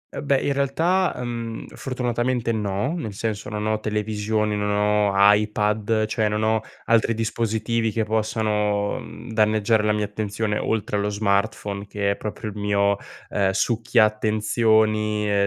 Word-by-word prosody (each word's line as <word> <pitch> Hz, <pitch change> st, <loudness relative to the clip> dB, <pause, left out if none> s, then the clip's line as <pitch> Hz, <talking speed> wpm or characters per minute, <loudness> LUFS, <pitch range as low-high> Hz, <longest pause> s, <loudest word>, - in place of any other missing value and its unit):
Eh, -, -, -4 dB
beh, 140 Hz, -1 st, +2 dB
in 140 Hz, -, 0 dB
realtà, 165 Hz, +7 st, +1 dB
mhmm, 115 Hz, -2 st, -5 dB
fortunatamente, 125 Hz, -2 st, -1 dB
no, 105 Hz, +5 st, -1 dB
nel 130 Hz, -, -4 dB
senso 105 Hz, +1 st, -3 dB
non 105 Hz, -1 st, -3 dB
ho 110 Hz, 0 st, 0 dB
televisioni, 105 Hz, 0 st, -1 dB
non 105 Hz, 0 st, -1 dB
ho 105 Hz, 0 st, +2 dB, 0.2 s
iPad, 105 Hz, +1 st, +1 dB
cioè 110 Hz, 0 st, 0 dB
non 105 Hz, +1 st, -1 dB
ho 110 Hz, 0 st, +2 dB, 0.2 s
altri 115 Hz, 0 st, +3 dB
dispositivi 115 Hz, 0 st, -1 dB
che 110 Hz, +1 st, 0 dB
possano, 105 Hz, -2 st, 0 dB
mhmm, 120 Hz, -, -10 dB
danneggiare 110 Hz, 0 st, +3 dB
la 105 Hz, -, +2 dB
mia 105 Hz, 0 st, 0 dB
attenzione 105 Hz, +1 st, -2 dB
oltre 105 Hz, -2 st, -1 dB
allo 100 Hz, 0 st, 0 dB
smartphone, 100 Hz, 0 st, -1 dB
che 100 Hz, -1 st, -1 dB
è -, -, -1 dB
proprio 105 Hz, +1 st, -5 dB
il 105 Hz, -, -10 dB
mio, 100 Hz, -1 st, +1 dB, 0.3 s
ehm, 100 Hz, -2 st, +1 dB
succhia 115 Hz, +2 st, +2 dB
attenzioni, 110 Hz, -1 st, +1 dB
110 Hz, 145 wpm, -23 LUFS, 105-115 Hz, 0.3 s, altri